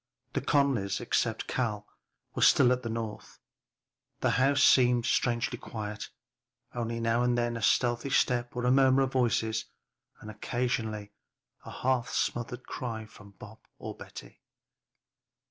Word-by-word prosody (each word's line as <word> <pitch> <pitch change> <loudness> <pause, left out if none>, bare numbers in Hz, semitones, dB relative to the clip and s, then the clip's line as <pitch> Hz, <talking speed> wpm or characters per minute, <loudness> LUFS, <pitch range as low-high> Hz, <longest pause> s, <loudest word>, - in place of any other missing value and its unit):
The - - -1
Conlys, 130 -9 +1
except 115 -1 -1
Cal, 105 -5 -2 0.5
were - - -4
still 125 - +6
at 125 0 +1
the 115 - -5
North; 110 -2 -6 0.8
the - - +2
house 140 +3 +3
seemed 125 -2 +5
strangely 120 0 0
quiet, 105 -1 -6 0.6
only 115 -1 -3
now 115 +1 +1
and 125 0 +2
then 120 0 0
a 115 - -5
stealthy 120 +5 +1
step 120 -2 +1
or 125 0 -2
a 125 - +4
murmur 135 0 +5
of 130 - -2
voices 115 -3 +1 0.5
and 110 - -9
occasionally 110 -2 -3 0.5
a - - -8
half 125 -1 0
smothered 120 +1 -2
cry 115 -3 -5
from 105 -1 -16
Bob 110 +1 -12 0.2
or - - -7
Betty. - - -12
120 Hz, 140 wpm, -29 LUFS, 110-125 Hz, 0.8 s, still